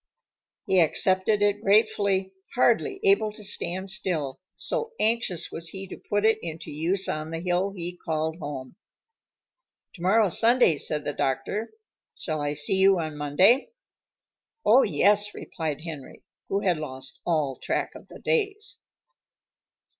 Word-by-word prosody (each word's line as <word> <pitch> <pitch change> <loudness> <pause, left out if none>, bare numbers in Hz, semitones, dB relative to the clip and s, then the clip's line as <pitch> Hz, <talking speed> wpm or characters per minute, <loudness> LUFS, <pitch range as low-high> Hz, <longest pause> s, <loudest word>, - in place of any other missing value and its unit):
He 190 - +3
accepted 190 +5 +3
it 205 0 +1
gratefully, 200 -2 +2 0.2
hardly 250 - +2
able 395 - +3
to 215 - -11
stand 190 -1 -1
still, 155 -8 -1 0.2
so 460 0 -2
anxious 220 -6 0
was 165 0 -3
he 195 +1 -7
to - - -9
put 205 +1 +1
it 220 0 +3
into 165 -1 -6
use 170 +6 0
on 155 +1 -3
the 165 0 -4
hill 180 +2 0
he 180 -2 -6
called 160 0 -2
home. 140 -3 -7 1.2
"Tomorrow's 195 +2 +3
Sunday," 230 - +4
said 150 +1 -1
the 145 - -3
doctor. 135 - -2 0.5
"Shall 155 -3 -3
I 145 0 -1
see 150 +6 +2
you 190 0 +5
on 155 -2 -4
Monday?" 185 - +3 0.9
"Oh, 245 +5 +7
yes," 205 - +2
replied 155 -3 -5
Henry, 155 -5 -9 0.3
who 195 +1 0
had 180 -4 +1
lost 130 -3 -7
all 150 -6 0
track - - -2
of - - -13
the - - -12
days. 425 -3 -1
185 Hz, 140 wpm, -26 LUFS, 155-210 Hz, 1.2 s, Oh